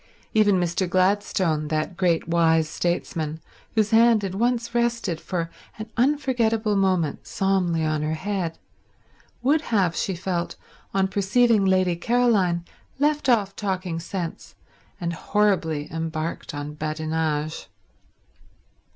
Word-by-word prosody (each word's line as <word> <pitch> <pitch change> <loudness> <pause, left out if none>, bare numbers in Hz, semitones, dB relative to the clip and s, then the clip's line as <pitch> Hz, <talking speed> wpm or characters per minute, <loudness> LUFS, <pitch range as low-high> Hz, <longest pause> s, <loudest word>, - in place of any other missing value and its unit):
Even 205 -3 +4
Mr. 175 +1 0
Gladstone, 185 -4 +1
that 155 +4 -2
great 175 -3 +1
wise 165 -2 +3
statesman, 160 -2 -2 0.4
whose 215 -1 +2
hand 225 -1 +5
had 190 -2 -3
once 235 +2 0
rested 235 -8 0
for 170 -3 -3 0.3
an 220 0 -7
unforgettable 235 -5 +1
moment 185 -6 0
solemnly 180 -4 +1
on 155 -1 0
her 155 +1 -1
head, 185 -2 -3 0.9
would 295 +4 +3
have, 195 - +1
she 190 - -1
felt, 175 -1 -3 0.4
on 195 -1 +2
perceiving 205 +2 +3
Lady 185 -2 +3
Caroline 195 -5 +2 0.3
left 295 0 +1
off 205 -5 +2
talking 185 -4 -2
sense 170 0 -6 0.4
and 170 -2 -2
horribly 170 -6 0
embarked 160 -1 -4
on 145 +1 -5
badinage. 155 -1 -2
185 Hz, 115 wpm, -24 LUFS, 165-215 Hz, 0.9 s, hand